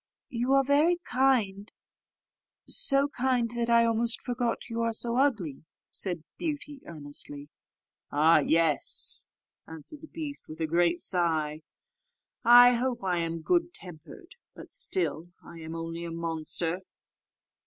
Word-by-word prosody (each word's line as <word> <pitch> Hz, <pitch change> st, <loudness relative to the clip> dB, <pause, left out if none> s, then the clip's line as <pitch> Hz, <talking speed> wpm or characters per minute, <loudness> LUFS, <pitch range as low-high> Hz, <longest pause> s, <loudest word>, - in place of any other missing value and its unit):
"You 245 Hz, +1 st, -1 dB
are 275 Hz, 0 st, +5 dB
very 295 Hz, +6 st, +3 dB
kind 225 Hz, -6 st, 0 dB, 0.9 s
so 275 Hz, +1 st, +2 dB
kind 250 Hz, -4 st, -1 dB
that 235 Hz, 0 st, -2 dB
I 235 Hz, 0 st, +5 dB
almost 230 Hz, +1 st, +1 dB
forgot 245 Hz, -2 st, -3 dB
you 230 Hz, -1 st, -3 dB
are 230 Hz, 0 st, 0 dB
so 235 Hz, +2 st, -1 dB
ugly," 210 Hz, -, 0 dB, 0.3 s
said 175 Hz, -5 st, 0 dB, 0.2 s
Beauty, 290 Hz, -3 st, -5 dB
earnestly. 145 Hz, -2 st, -7 dB, 0.6 s
"Ah! 155 Hz, +3 st, +5 dB
yes," 160 Hz, -3 st, +3 dB, 0.4 s
answered 160 Hz, -, -8 dB
the 315 Hz, -, -11 dB
beast, 305 Hz, -4 st, -7 dB
with 155 Hz, +1 st, -10 dB
a 160 Hz, -, 0 dB
great 170 Hz, +2 st, +1 dB
sigh; 160 Hz, -4 st, 0 dB, 0.8 s
"I 245 Hz, +1 st, +8 dB
hope 245 Hz, -1 st, -2 dB
I 180 Hz, -2 st, 0 dB
am 165 Hz, -1 st, -3 dB
good 345 Hz, -, 0 dB
tempered, 185 Hz, -, -10 dB, 0.2 s
but -, -, -12 dB
still 375 Hz, -, -1 dB, 0.2 s
I 170 Hz, -, -11 dB
am 160 Hz, 0 st, -7 dB
only 165 Hz, +1 st, -5 dB
a 170 Hz, -, -6 dB
monster." 165 Hz, +1 st, -3 dB
225 Hz, 130 wpm, -28 LUFS, 165-260 Hz, 0.9 s, I